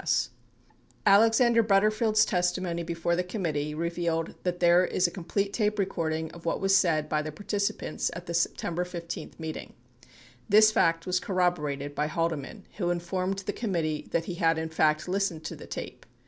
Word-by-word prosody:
38 - - +1 0.8
Alexander 225 +3 +5
Butterfield's 215 +1 +3
testimony 180 -2 -1
before 170 0 -1
the 180 - 0
committee 155 -6 -3
revealed 170 0 -2
that 180 -1 -2
there 175 +1 +5
is 185 0 +1
a 175 - +1
complete 200 +3 -2
tape 210 -1 0
recording 160 -5 -2
of 170 - -12
what 165 - -1
was 195 0 +3
said 160 -6 +2
by 150 0 0
the 155 0 -5
participants 200 +5 -2
at 175 +1 -7
the 170 - -5
September 170 +1 0
15 170 -1 -7
meeting. 160 -1 -6 0.4
39 125 - -24 0.3
This 215 +1 +7
fact 165 -5 +2
was 185 0 +1
corroborated 150 -7 -1
by 150 +1 -1
Halde 165 +1 0
man 190 +9 -10
who 175 -4 0
informed 185 +3 -2
the 205 - -2
committee 165 -9 -2
that 165 - 0
he 180 - -4
had 165 -2 +2
in 160 0 -3
fact 155 -1 +1
listened 180 -4 -1
to 150 - -5
the - - -11
tape. - - -7
175 Hz, 175 wpm, -28 LUFS, 165-195 Hz, 0.8 s, This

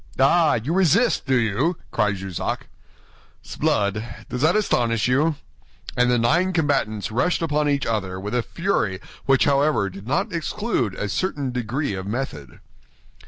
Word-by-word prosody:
"Ah! 155 +4 +4
You 120 +8 -2
resist, 190 - +3
do 135 - +3
you?" 125 - +1
cried 105 -3 +1
Jussac. 95 -2 -4 0.8
"S'blood; 100 +1 0 0.3
does 125 - -4
that 160 +5 +4
astonish 120 - +1
you?" 145 +5 +2 0.6
And 125 0 +3
the 125 - +3
nine 170 +11 +2
combatants 135 - 0
rushed 165 +10 +1
upon 150 -2 +1
each 140 -1 0
other 95 -5 -2
with 105 +3 -5
a 125 - +2
fury 115 - -1 0.3
which 135 -1 +4
however 140 -8 +2
did 100 +3 -11
not 185 - 0
exclude 165 - -1
a 105 - -3
certain 140 - -2
degree 125 +2 -2
of 95 0 -5
method. 100 - -5
130 Hz, 150 wpm, -23 LUFS, 105-160 Hz, 0.8 s, Ah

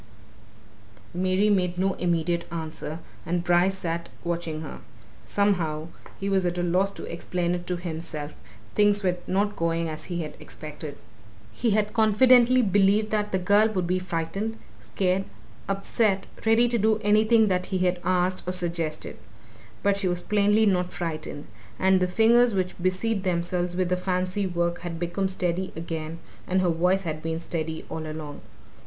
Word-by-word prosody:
Mary 185 +3 +2
made 180 -4 +2
no 190 +1 +1
immediate 170 -1 0
answer, 160 -1 -5 0.3
and 175 0 -1
Bryce 175 +2 +3
sat 170 -2 -3
watching 170 -2 -3
her. 155 - -7 0.5
Somehow 170 -6 0 0.3
he 195 - -3
was 195 -1 +2
at 175 0 -1
a 175 - 0
loss 180 +3 +2
to - - -9
explain 175 +1 -2
it 175 0 -4
to 180 - -1
himself 160 -3 -5 0.4
things 205 0 +3
were 180 -1 +1
not 205 +2 +1
going 165 0 0
as 155 0 -6
he 175 -2 -3
had 150 - -8
expected. 150 -1 -8 0.5
He 235 - 0
had 210 0 0
confidently 245 +3 +5
believed 205 +1 +3
that 210 -1 0
the 190 - +2
girl 205 +4 +4
would 190 -5 -1
be 185 +1 +1
frightened, 185 +5 -3 0.2
scared, 190 0 0 0.4
upset, 195 0 +1 0.2
ready 225 +2 +5
to 235 -1 +1
do 215 +1 +3
anything 215 +2 +4
that 180 -1 0
he 185 -1 +1 0.2
asked 185 +1 +1
or 180 - -1
suggested. 170 -3 -2 0.6
But 200 0 +3
she 200 -2 -1
was 175 0 -1
plainly 210 +1 +3
not 180 -3 +1
frightened. 155 -3 -5 0.3
And 190 0 +4
the 180 - +2
fingers 230 +4 +4
which 185 -1 0
busied 190 +3 0
themselves 175 -1 -1
with 180 -1 0
the 180 - +1
fancy 185 +2 -1
work 170 -1 -1
had 170 -1 -5
become 175 +3 -1
steady 185 0 -1
again, 160 0 -5 0.3
and 185 +1 +2
her 180 - +2
voice 180 +4 +2
had 155 -3 -4
been 160 0 -2
steady 160 -1 -4
all 160 -1 -5
along. 155 -1 -7
180 Hz, 160 wpm, -26 LUFS, 170-200 Hz, 0.6 s, confidently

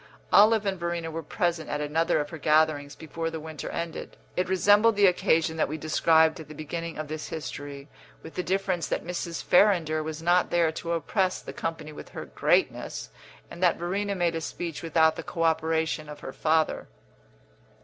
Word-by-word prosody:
Olive 215 +1 +6
and 190 -2 -1
Verena 170 -1 -3
were 165 +1 -4
present 165 +1 -2
at 145 - -2
another 155 +3 +1
of 145 0 -3
her 160 - -7
gatherings 150 -2 +2
before 165 +1 -4
the 160 0 -5
winter 155 -1 -7
ended; 170 -1 -5 0.2
it 180 0 -1
resembled 205 +4 +4
the 205 0 +5
occasion 165 -3 +2
that - - +2
we 155 - -4
described 160 +1 +3
at 160 - -9
the 155 - -10
beginning 165 +2 -5
of 155 0 -4
this 155 0 -5
history, 145 -2 -7 0.4
with 160 - -10
the - - -2
difference 185 -1 -1
that - - -2
Mrs. 175 -1 -4
Farrinder 175 -5 +3
was 155 0 -5
not 175 +2 +2
there 170 -2 +2
to 170 +1 -4
oppress 185 +3 0
the - - -9
company 160 -2 -5
with - - -10
her - - -7
greatness, 60 0 0 0.4
and 170 - -9
that 180 -2 +3
Verena 200 +4 -2
made 175 -2 +1
a 165 - -3
speech 165 -1 -5
without 160 -1 +3
the - - -3
co 165 - -4
operation 160 -1 0
of 150 - -9
her - - -7
father. 160 0 +1
165 Hz, 190 wpm, -27 LUFS, 155-175 Hz, 0.4 s, Olive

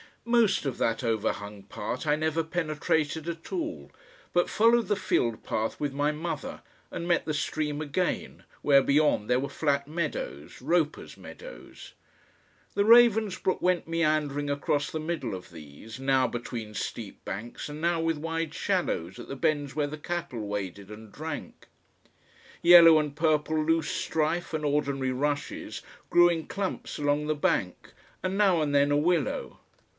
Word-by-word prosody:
Most 235 -8 +3
of 135 - -2
that 115 +3 0
overhung 105 -3 -2
part 115 +7 -5
I 150 - +4
never 160 +1 0
penetrated 160 -1 -1
at 165 -1 -6
all, 320 -4 -4 0.4
but 175 - +2
followed 230 +1 +4
the 205 - +2
field 120 - 0
path 110 +1 -2
with 145 -2 -2
my 145 +2 +1
mother 160 +3 -5 0.3
and 170 - -5
met 175 -1 +2
the 155 - -1
stream 150 0 -2
again, 155 +4 -2 0.2
where 140 -2 +6
beyond 140 -6 +2
there 125 0 +3
were 140 - -3
flat 140 -2 0
meadows, 150 - -4
Roper's 155 +2 0
meadows. - - -11 0.8
The 200 - +1
Ravensbrook 220 -5 +5
went 180 -2 +1
meandering 155 -3 0
across 145 +1 0
the 160 - -4
middle 155 - -3
of 90 - -10
these, 80 - -11
now 135 -1 +2
between 115 -2 -6
steep 110 -1 -5
banks, 105 +5 -6
and 150 +1 -7
now 170 0 +1
with 165 -1 0
wide 165 0 -3
shallows 170 - -1
at - - -9
the 135 - -5
bends 145 -1 0
where 150 -1 0
the 150 +2 -6
cattle 160 -9 -4
waded 100 -1 -5
and 105 0 -11
drank. 155 0 -7 0.9
Yellow 170 -2 +9
and 150 -2 -3
purple 155 -1 +1
loose 165 +1 +1
strife 160 +2 -1
and 155 -1 -2
ordinary 140 -2 0
rushes 145 +3 -3 0.3
grew 175 0 +6
in 165 -2 -2
clumps 195 -2 -4
along 145 0 +1
the 155 - +1
bank, 95 -10 -1 0.3
and 185 +1 -1
now 190 -5 +4
and 145 -2 0
then 140 0 +4
a 145 - +3
willow. 165 -1 0
150 Hz, 155 wpm, -28 LUFS, 135-170 Hz, 0.9 s, Yellow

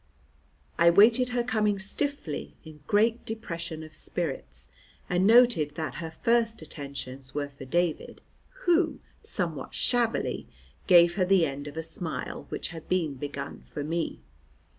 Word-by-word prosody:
I 170 0 +7
waited 225 +7 +6
her 245 -1 0
coming 215 -4 +1
stiffly, 205 - -3
in 155 -1 -11
great 225 +3 +3
depression 170 -7 -5
of 155 0 -12
spirits, 155 -1 -4 0.4
and 180 +2 +2
noted 225 -11 +5
that 160 -1 -3
her 165 - -4
first 230 +3 +1
attentions 140 -3 -8
were 145 -1 -1
for 140 -1 -11
David, 170 +3 -1 0.5
who, 345 -1 +3 0.2
somewhat 170 - -3
shabbily, 240 -2 0 0.4
gave 175 -1 +6
her 185 - +3
the 185 -2 +4
end 145 0 -5
of 145 +2 -8
a 160 - -2
smile 160 0 -3
which - - -4
had 165 -2 -10
been 170 -5 +1
begun 140 +1 -6
for 145 - -6
me. 165 +2 -2
170 Hz, 140 wpm, -28 LUFS, 150-220 Hz, 0.5 s, I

